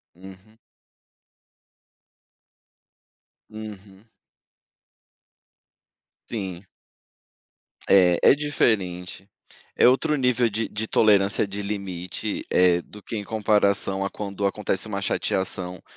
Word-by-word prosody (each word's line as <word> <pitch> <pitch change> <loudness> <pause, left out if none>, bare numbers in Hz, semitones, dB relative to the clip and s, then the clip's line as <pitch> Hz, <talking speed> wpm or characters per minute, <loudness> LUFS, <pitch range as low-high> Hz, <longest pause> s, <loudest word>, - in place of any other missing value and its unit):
Uhum. 95 +4 -15 2.9
Uhum. 105 -2 -10 2.2
Sim. 95 -5 -5 1.2
É, 90 -3 +5
é - - +7
diferente. 100 -10 -1 0.5
É - - +6
outro 135 +4 +2
nível 125 -3 +2
de 110 +1 -3
de 110 +1 -4
tolerância 100 -2 +3
de 100 +1 -5
limite, 100 0 -4
eh, 90 -1 +4
do 105 +3 -14
que 115 - -6
em 105 - -4
comparação 100 -3 +1
a 100 - -2
quando 100 -1 -4
acontece 100 0 -2
uma 100 -2 -4
chateação 90 -2 -2
100 Hz, 90 wpm, -24 LUFS, 95-110 Hz, 2.9 s, é